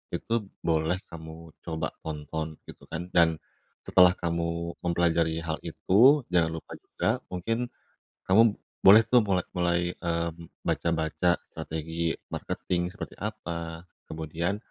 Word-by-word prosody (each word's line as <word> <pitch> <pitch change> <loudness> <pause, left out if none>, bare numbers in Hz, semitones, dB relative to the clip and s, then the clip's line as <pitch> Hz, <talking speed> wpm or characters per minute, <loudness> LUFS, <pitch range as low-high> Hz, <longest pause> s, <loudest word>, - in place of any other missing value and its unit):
itu - - -3 0.3
boleh 80 +1 +2 0.2
kamu 80 0 -10
coba 80 -2 -3
tonton 80 0 -5
gitu - - -13
kan. 90 +3 -6
Dan 85 -2 +4 0.5
setelah 90 0 +6
kamu 85 -1 -2
mempelajari 85 -1 +1
hal 80 -1 -3
itu, 130 +9 +4
jangan 85 -2 +3
lupa 80 - -9
juga - - -1
mungkin 115 +7 -2 0.6
kamu 105 +4 +8 0.4
boleh 105 +4 +9
tuh 120 +2 +5
mulai 95 -5 +1
mulai, 90 -1 +1 0.2
mmm, 85 -1 -4
baca-baca 85 +2 +1
strategi 80 +1 -3 0.2
marketing 90 -1 -2
seperti 95 +4 -8
apa, 85 -5 -5 0.2
kemudian, 80 +5 -2
85 Hz, 120 wpm, -28 LUFS, 80-90 Hz, 0.6 s, boleh